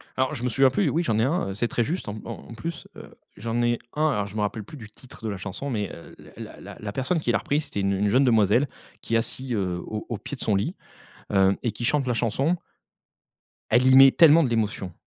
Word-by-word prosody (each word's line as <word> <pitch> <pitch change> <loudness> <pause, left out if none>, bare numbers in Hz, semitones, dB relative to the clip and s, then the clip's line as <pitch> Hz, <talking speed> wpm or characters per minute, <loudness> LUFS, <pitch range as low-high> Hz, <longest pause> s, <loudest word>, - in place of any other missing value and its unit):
Alors, 130 +3 0
je 125 - -6
me 125 - +1
souviens 135 +3 +4
plus, 155 +5 +1
oui, 165 +5 0
j'en 110 -9 0
ai - - +3
un, 135 - 0
heu, - - -4
c'est 110 +5 -1
très 120 - 0
juste, 170 - -3
en 105 - -5
en 115 0 -8
plus, 165 +8 -6
heu, - - -11 0.3
j'en 115 +3 -2
ai 120 0 +1
un. 155 +1 +1
Alors 105 -6 -1
je 100 - -12
me 105 - -1
rappelle 105 +1 -2
plus 150 - -12
du 110 -4 -11
titre 125 +1 -16
de - - -1
la 100 - -4
chanson, 105 +9 -5
mais, 105 -6 -2
heu, 85 - -12 0.2
la - - -9
la - - -10
la 105 - -5
personne 135 - -1
qui - - 0
l'a - - +3
repris 145 +2 0
c'était 105 -9 -4
une 100 - +1
une 100 +1 +1
jeune 130 +6 +4
demoiselle, 115 +2 +3 0.3
qui 115 - -2
est - - +6
assise, 130 +3 -3
heu, 95 -5 -1
au 110 0 -5
au 115 - -2
pied 145 - -7
de - - -10
son 105 -3 +2
lit, 155 - -1 0.6
heu, 95 0 +4
et 120 - -1
qui 120 - -6
chante 140 +1 +1
la 125 - 0
chanson 135 +9 0 1.1
elle 125 +3 +4
y 130 0 +6
met 135 0 +9
tellement 165 0 +6
de 125 - 0
l'émotion. 105 -6 -2
120 Hz, 265 wpm, -25 LUFS, 105-135 Hz, 1.1 s, met